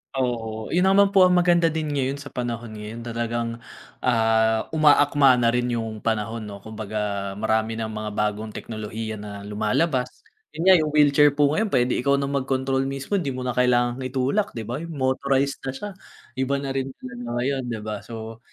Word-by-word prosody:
Oo, 115 -4 -2
yun 180 +2 +3
naman 195 +1 +5
po 190 -2 +6
ang 180 - +3
maganda 175 -1 +4
din 155 -1 -2
ngayon 135 -1 0
sa 140 0 -10
panahon 120 -2 -4
ngayon 110 +2 -7
talagang, 115 0 -2 0.5
ah, 110 -2 +2
umaakma 145 -3 +5
na 120 -1 +3
rin 125 0 0
yung 110 -2 -4
panahon 110 0 -2
'no, 100 -1 -9
kumbaga 105 -2 -4
marami 110 +1 0
ng 110 -1 -3
mga 110 0 -4
bagong 105 +1 -1
teknolohiya 110 0 -5
na 100 -1 -8
lumalabas. 125 - -1 0.3
Yun 165 - -3
nga 190 0 +8
yung 155 - 0
wheelchair 145 0 +6
po 145 -1 +3
ngayon 215 +7 +1
pwede 125 -6 +2
ikaw 140 +2 +2
na 140 - 0
mag-control 135 -1 0
mismo 135 +9 -2
di 140 -7 -3
mo 130 - -4
na 125 - -1
kailangang 125 0 +2
itulak, 135 - -1
'di 115 - -4
ba? 120 +6 -4
Motorized 140 -1 0
na - - 0
siya. 205 +10 -5 0.5
Iba 130 +1 +1
na 135 -1 -3
rin 135 0 -1
talaga 125 -1 -8
ngayon, 135 +2 0
'di 115 -3 -3
ba? 105 -1 -4
So 115 -1 -8
125 Hz, 180 wpm, -24 LUFS, 110-140 Hz, 0.5 s, nga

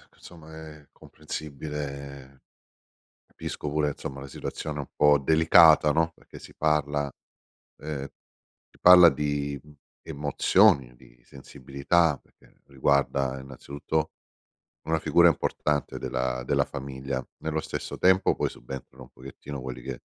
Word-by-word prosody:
insomma 80 -2 -14 0.2
è 75 -2 -21
comprensibile. 70 -3 -8 0.8
Capisco 75 - -6
pure 75 0 0
insomma 70 -1 -7
la 70 - -8
situazione 75 +2 -6
un 70 - -6
po' 75 -1 +4
delicata, 80 +1 +5
no, 80 +2 +1
perché - - -15
si - - -14
parla 75 -2 0 0.7
ehm, 75 -2 -5 0.7
si - - -26
parla 90 -1 +9
di 70 -1 -3 0.4
emozioni, 70 -3 +2
di - - -21
sensibilità, 70 +4 -1
perché - - -28
riguarda 70 -1 0
innanzitutto 70 +4 -4 0.8
una 80 0 +1
figura 85 +3 +4
importante 75 -2 -1
della 65 0 -3
della - - +2
famiglia. 65 -1 -5 0.2
Nello 80 0 -2
stesso - - -6
tempo, 95 +1 +3
poi - - 0
subentrano 65 +1 -10
un 65 - -16
pochettino 65 +1 -10
quelli 65 -1 -7
che 65 0 -7
70 Hz, 120 wpm, -26 LUFS, 65-75 Hz, 0.8 s, parla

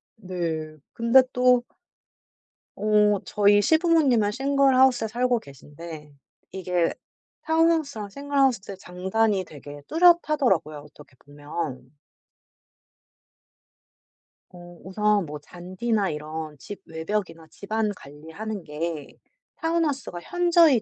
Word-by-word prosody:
네. 170 -6 -4 0.2
근데 235 +3 +5
또 250 -1 +4 1.1
어 210 0 +3
저희 205 0 +4
시부모님은 305 - +3
싱글하우스에 265 -2 +3
살고 245 +2 0
계신데 150 - -12 0.4
이게 180 -3 -1 0.5
타운하우스랑 320 -9 +1
싱글하우스의 270 -6 0
장단이 190 +2 -1
되게 145 -1 -11
뚜렷하더라고요 305 - +3
어떻게 150 -2 -17
보면. 145 -2 -6 2.6
어 175 -1 -13
우선 210 0 +1
뭐 150 -1 -7
잔디나 185 +6 -3
이런 155 0 -6
집 195 +9 -10
외벽이나 165 0 -4
집안 215 +1 -2
관리하는 160 +8 -8
게 155 0 -5 0.4
타운하우스가 310 - -1
현저히 340 - +4
205 Hz, 240 characters per minute, -25 LUFS, 160-255 Hz, 2.6 s, 근데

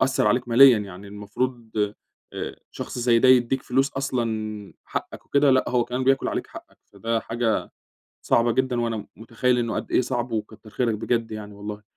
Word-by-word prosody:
أثّر 130 -4 +2
عليك 125 +3 +1
ماليًا 125 -1 +8
يعني 100 -1 -8
المفروض 110 +4 -4 0.6
آآ - - -5
شخص - - -6
زي 120 -1 +4
ده 130 - +4
يدّيك 130 +1 +4
فلوس 135 +2 +1
أصلًا 110 -6 -3
حقك - - -6
وكده 140 0 +3
لأ، 130 0 +4
هو 125 -1 +2
كمان 125 +2 -3
بياكل 135 +1 +2
عليك - - -3
حقك. - - -13 0.2
فده 115 0 -1
حاجة 115 -1 -1 0.6
صعبة 115 0 +3
جدًا 130 -1 0
وأنا 115 -1 -1
م 105 - -7
مُتخيّل 120 +2 0
إنه 115 -1 -1
قد - - -4
إيه - - +4
صعب 120 -1 -2
وكتّر 110 0 -5
خيرك 115 0 0
بجد 115 +1 -1
يعني 105 -1 -7
والله. 105 +1 -7
120 Hz, 180 wpm, -24 LUFS, 110-125 Hz, 0.6 s, ماليًا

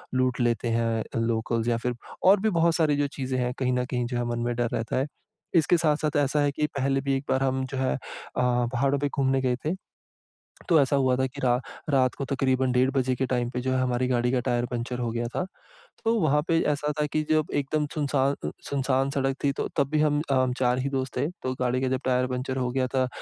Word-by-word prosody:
लूट 130 0 +1
लेते 120 -1 +1
हैं, 115 -1 0 0.2
लोकल्ज़ 115 0 0
या 115 - +2
फिर 125 +1 -2 0.3
और 195 +2 +6
भी 220 - +2
बहुत 170 -3 +2
सारी 155 -3 +3
जो 145 0 +1
चीज़ें 130 -1 -2
हैं, 125 0 0
कहीं 125 -1 +1
न 125 0 0
कहीं 125 -1 -2
जो 120 0 -3
है 120 - -1
मन 120 - -2
में 120 - 0
डर 120 -1 0
रहता 115 +2 -1
है। 135 +2 +1 0.5
इसके 170 +1 +4
साथ-साथ 155 -2 +1
ऐसा 145 +1 +2
है 145 0 +2
कि 150 +2 -1
पहले 135 0 +1
भी 140 0 0
एक 135 - -6
बार 130 0 +2
हम 130 0 0
जो 130 +1 -6
है 130 0 +1
अ, - - -5 0.4
पहाड़ों 125 +2 +1
पे 145 - +1
घूमने 135 -1 +1
गए 125 -1 +1
थे। 155 - +1 1.0
तो 165 - +6
ऐसा 140 0 +2
हुआ 130 -2 +3
था 130 +1 +1
की 135 +2 -9
रा 125 -1 +4 0.3
रात 130 -3 +3
को 140 - -4
तकरीबन 130 -1 +1
डेढ़ 125 +1 +3
बजे 130 -1 +1
के 130 - 0
टाइम 125 -2 0
पे 125 - -3
जो 130 +1 -1
है 130 - +1
हमारी 125 0 +1
गाड़ी 120 -1 +1
का 130 - +2
टायर 120 0 0
पंक्चर 125 0 -4
हो 120 -2 -1
गया 120 0 -2
था। - - 0 0.6
तो 225 0 +2
वहाँ 150 -1 +3
पे 165 -1 +3
ऐसा 150 +1 -1
था - - +2
कि 155 - +2
जब 155 0 +2
एकदम 145 +2 0
सुनसा 145 -4 +1 0.2
अ, - - 0 0.2
सुनसान 135 -1 +1
सड़क 135 -1 0
थी, 140 - +3
तो - - -3
तब 140 -2 +2
भी 155 -1 +2
हम 140 -4 +2
4 125 0 +2
ही 135 +2 -1
दोस्त 130 -2 -3
थे। 135 +4 +1 0.2
तो 130 - -1
गाड़ी 125 +1 +1
का 130 - +1
जब 130 0 0
टायर 130 0 +2
पंक्चर 130 +1 -3
हो 125 -1 0
गया 130 0 0
था 130 - +3
अ, - - 0
130 Hz, 250 wpm, -26 LUFS, 125-140 Hz, 1.0 s, और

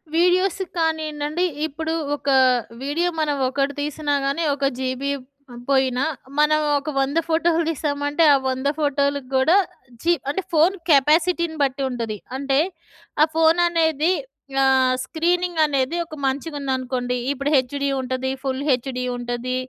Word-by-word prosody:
Videos 360 +2 +2 0.2
కానియండి 315 -2 -1
అంటే 340 +4 -1 0.2
ఇప్పుడు 320 +2 -4 0.2
ఒక 285 - -4 0.5
వీడియో 330 +5 0
మనం 295 -2 +1
ఒకటి 275 +1 -1
తీసినా 295 0 -2
గాని 280 +5 0
ఒక 280 -1 -2
జీబీ 260 +2 -2 0.6
పోయినా. 265 -1 +2 0.4
మనం 305 +1 +4 0.2
ఒక 295 - -6
100 275 +4 0
ఫోటోలు 330 +1 +2
తీసామంటే, 290 0 -1
ఆ - - +6
100 260 +2 -2
ఫోటోలు 285 -1 +1 0.2
కూడా 315 +9 +4 0.4
జీ 340 - +2 0.2
అంటే 380 +7 -1
ఫోన్ 330 +5 +4
కెపాసిటీని 320 +3 +3
బట్టి 275 +1 -1
ఉంటది. 230 -4 -4 0.2
అంటే 275 0 +1 0.6
ఆ - - +7
ఫోన్ 325 +1 +4
అనేది 320 -1 +2 0.5
ఆహ్, 260 -1 +4
స్క్రీనింగ్ 345 +3 -1
అనేది 280 +3 0
ఒక 310 -1 -10
మంచిగుందనుకోండి. 265 -3 -2 0.2
ఇప్పుడు 280 +1 -2
హెచ్‍డీ 280 +1 +1
ఉంటది 260 0 -2
ఫుల్‌హెచ్‍డీ 260 -2 -1
ఉంటది 245 +1 -3
285 Hz, 130 wpm, -22 LUFS, 265-320 Hz, 0.6 s, ఆ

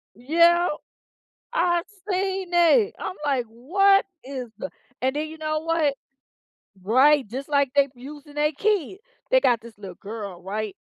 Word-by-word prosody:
Yep. 335 +7 +3 0.8
I've 345 -1 +1 0.3
seen 380 0 -1
it, 375 +6 +4
I'm 370 - -5
like, 265 -4 +1
"What 390 - +3 0.2
is 260 -3 -6
the" 280 - -5 0.3
and 260 +2 0
then 310 +1 -2
you 320 - -10
know 310 0 -2
what? 320 -3 +1 0.9
Right, 265 +7 +4
just 265 +5 -6
like 280 -2 +2
they 280 -1 +4
using 290 +3 -11
they 300 +1 +2
kid. 380 +2 0 0.3
They - - +6
got 240 - +2
this 230 -2 -13
little 190 -4 -9
girl, 200 -4 -8
right? 210 +2 -4
290 Hz, 150 wpm, -24 LUFS, 245-345 Hz, 0.9 s, They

